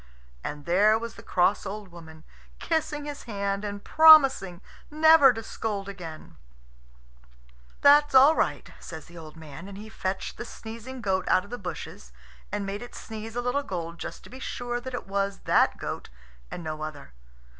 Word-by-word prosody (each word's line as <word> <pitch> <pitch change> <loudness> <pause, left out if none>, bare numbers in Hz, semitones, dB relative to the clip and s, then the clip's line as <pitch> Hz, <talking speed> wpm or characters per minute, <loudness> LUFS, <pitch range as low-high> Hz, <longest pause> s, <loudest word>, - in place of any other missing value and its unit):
And 145 0 -6
there 205 +5 +4
was 230 +1 -6
the - - -12
cross 190 +3 +1
old 200 0 -6
woman, 160 -2 -13 0.3
kissing 310 -2 -2
his 290 -1 -7
hand 200 -2 -2
and 205 -1 -5
promising 270 - +6 0.3
never 310 -2 +7
to 225 -2 -6
scold 205 -4 -4
any 195 -3 -9 0.2
more. - - -19 1.5
"That's 290 0 +6
all 275 +5 +8
right," - - -1
says 160 -3 -9
the 170 0 -12
old 155 -1 -11
man; 160 +2 -10
and 200 -1 -9
he 215 +2 -9
fetched 190 -3 -4
the - - -5
sneezing 230 +3 -9
goat 190 -3 -1
out 185 - +4
of 205 - -15
the 245 - -5
bushes 175 - -8 0.4
and 205 0 -2
made 195 +1 -4
it 245 - -10
sneeze 220 0 -8
a 245 - -1
little 250 +3 0
gold, 170 -8 -6
just - - -7
to - - -14
be 260 - -10
sure 245 -2 -4
that 260 0 -6
it - - -6
was 195 0 -2
that - - +3
goat - - -6 0.4
and 175 - -7
no 155 -1 -5
other. 155 - -7
205 Hz, 180 wpm, -27 LUFS, 180-245 Hz, 1.5 s, all